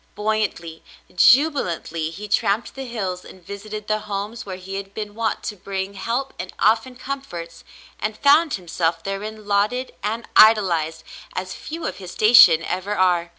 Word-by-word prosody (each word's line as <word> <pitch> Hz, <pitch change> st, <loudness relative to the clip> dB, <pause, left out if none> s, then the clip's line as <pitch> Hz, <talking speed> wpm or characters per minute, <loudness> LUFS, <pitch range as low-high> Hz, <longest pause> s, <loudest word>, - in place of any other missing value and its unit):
Buoyantly, 210 Hz, -6 st, -2 dB, 0.3 s
jubilantly, 195 Hz, -, +3 dB
he 200 Hz, +6 st, -8 dB
tramped 205 Hz, +1 st, 0 dB
the 270 Hz, -1 st, -7 dB
hills 190 Hz, -6 st, -4 dB
and 185 Hz, -2 st, -15 dB
visited 210 Hz, +2 st, -7 dB
the 215 Hz, 0 st, +1 dB
homes 210 Hz, +2 st, -5 dB
where 190 Hz, -, -5 dB
he 190 Hz, +1 st, -7 dB
had 195 Hz, 0 st, -8 dB
been 210 Hz, -1 st, -5 dB
wont 225 Hz, 0 st, -2 dB
to 210 Hz, -, -4 dB
bring 195 Hz, 0 st, -5 dB
help 235 Hz, +7 st, -3 dB
and 180 Hz, +1 st, -5 dB
often 225 Hz, +4 st, +2 dB
comforts, 245 Hz, -12 st, -7 dB, 0.4 s
and 215 Hz, 0 st, -3 dB
found 295 Hz, +2 st, +4 dB
himself 165 Hz, -2 st, -2 dB
therein 210 Hz, +3 st, -5 dB
lauded 210 Hz, +6 st, 0 dB
and 225 Hz, +3 st, -3 dB
idolized 170 Hz, -8 st, +5 dB, 0.3 s
as 185 Hz, 0 st, -4 dB
few 320 Hz, -, -7 dB
of -, -, -4 dB
his 185 Hz, -3 st, -9 dB
station 215 Hz, -7 st, +7 dB
ever 185 Hz, +4 st, -3 dB
are. 180 Hz, -3 st, +2 dB
200 Hz, 155 wpm, -22 LUFS, 180-220 Hz, 0.4 s, station